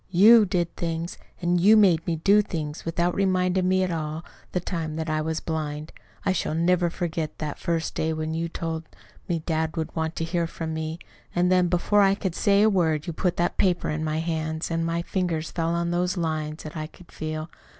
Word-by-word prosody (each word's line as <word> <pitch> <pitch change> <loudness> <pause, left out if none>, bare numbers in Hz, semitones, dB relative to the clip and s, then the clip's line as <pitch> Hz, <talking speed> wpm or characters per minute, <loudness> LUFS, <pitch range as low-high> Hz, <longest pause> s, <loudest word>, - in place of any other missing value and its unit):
You 210 +4 +7
did 175 -3 -1
things, 165 0 -3 0.2
and 175 0 +2
you 215 +4 +7
made 180 -6 +4
me 170 - +1
do 200 +6 +4
things, 155 -6 -5
without 170 +1 0
reminding 185 -1 +1
me 185 0 +3
all 160 -2 -3 0.3
the 180 - 0
time 165 -3 -3
that 160 0 -2
I 155 0 +1
was 160 +1 -2
blind. 155 -1 -4 0.3
I 190 - +3
shall 160 -3 -1
never 175 +1 +2
forget 165 -2 -3
that 150 -2 -4
first 165 -2 -1
day 160 - 0
when 155 0 -2
you 165 +1 -2
told 165 -1 -4 0.4
me 165 -2 -1
dad 160 -1 -1
would 160 - -3
want 160 0 -2
to - - -2
hear 170 0 0
from 165 -1 -5
me; 160 0 -3 0.4
and 180 +1 +3
then, 180 -1 +4
before 180 +4 +3
I 195 0 +5
could 190 -3 -3
say 200 +3 +3
a - - +6
word, 165 -7 +2
you 170 - -4
put 180 +2 -1
that 175 +1 0
paper 180 -2 +2
in 155 +1 -2
my 155 0 -1
hands, 160 0 -2
and 165 0 0
my 165 +1 -1
fingers 170 -4 -2
fell 165 -1 -1
on 170 0 0
those 180 +1 0
lines 155 -2 -2
that 155 - -8
I 155 -1 -4
could 175 +2 -18
feel. 155 +1 -5
165 Hz, 210 wpm, -25 LUFS, 160-180 Hz, 0.4 s, You